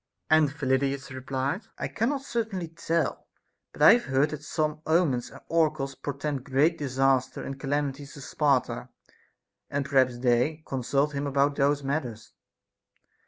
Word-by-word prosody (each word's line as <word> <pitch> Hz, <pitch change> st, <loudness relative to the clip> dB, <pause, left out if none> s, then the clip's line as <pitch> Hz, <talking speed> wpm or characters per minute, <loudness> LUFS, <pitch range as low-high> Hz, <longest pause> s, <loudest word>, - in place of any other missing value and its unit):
And 155 Hz, -2 st, +5 dB
Phyllidas 135 Hz, -1 st, -1 dB
replied, 135 Hz, -, -3 dB
1 -, -, -3 dB
cannot 265 Hz, +5 st, -1 dB
certainly 215 Hz, -, -3 dB
tell, 165 Hz, 0 st, -2 dB, 0.4 s
but -, -, -2 dB
I -, -, +10 dB
have 240 Hz, -, +1 dB
heard 135 Hz, +3 st, +2 dB
that 150 Hz, -1 st, -5 dB
some 155 Hz, 0 st, -2 dB
omens 160 Hz, -7 st, +2 dB
and -, -, -13 dB
oracles 155 Hz, -4 st, +1 dB
portend 140 Hz, 0 st, -4 dB
great 140 Hz, +6 st, +2 dB
disasters 135 Hz, -2 st, +1 dB
and 135 Hz, 0 st, -6 dB
calamities 145 Hz, 0 st, -2 dB
to 145 Hz, -, -10 dB
Sparta; 135 Hz, -, 0 dB, 0.8 s
and 140 Hz, 0 st, -1 dB
perhaps 130 Hz, -3 st, +2 dB
they 125 Hz, +6 st, +1 dB
con 135 Hz, -1 st, -3 dB
sult 140 Hz, +4 st, +1 dB
him 140 Hz, 0 st, -2 dB
about 140 Hz, +1 st, +2 dB
those 145 Hz, +1 st, +2 dB
matters. 130 Hz, -6 st, -4 dB
140 Hz, 145 wpm, -27 LUFS, 135-155 Hz, 0.8 s, I